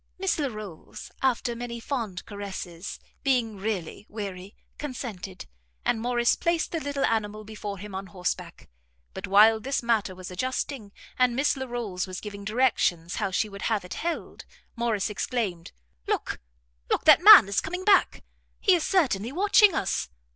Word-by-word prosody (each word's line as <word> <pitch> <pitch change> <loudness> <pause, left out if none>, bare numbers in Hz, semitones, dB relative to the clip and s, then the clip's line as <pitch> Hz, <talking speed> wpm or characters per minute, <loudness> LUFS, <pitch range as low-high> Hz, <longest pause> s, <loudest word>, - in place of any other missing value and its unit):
Miss 375 -3 0
Larolles, 215 - -6
after 245 -2 +1
many 235 0 -5
fond 230 -7 -4
caresses, 195 -3 -7 0.2
being 245 -6 +1
really 195 -1 -4
weary, 200 -2 -7 0.2
consented, 220 -10 -6 0.4
and 225 - +1
Morrice 240 0 +2
placed 340 -1 0
the 330 - -1
little 285 -2 -1
animal 215 -1 -1
before 210 -1 -6
him 205 +1 -9
on 190 0 -5
horseback; 180 0 -4 0.5
but - - -6
while 215 +3 +6
this 270 +3 -2
matter 220 -5 +1
was 185 0 -9
adjusting, 255 +1 -3 0.3
and 250 -1 +3
Miss 275 +4 +2
Larolles 240 -8 -4
was 185 0 -6
giving 200 -1 -8
directions 200 -7 +1
how 200 -3 0
she 190 +4 0
would 200 -1 -10
have 215 -5 0
it 180 - -7
held, 340 +1 -4 0.3
Morrice 230 -4 -1
exclaimed, 205 -6 -3 0.4
"Look, - - -2 0.5
look! - - 0
that 310 +1 +8
man 405 - +11
is 200 +1 0
coming 360 +3 -5
back! 405 -2 +4 0.4
He 385 - +4
is 345 -3 +2
certainly 250 - +1
watching 405 +3 +5
us. 70 - -1
220 Hz, 155 wpm, -26 LUFS, 195-265 Hz, 0.5 s, man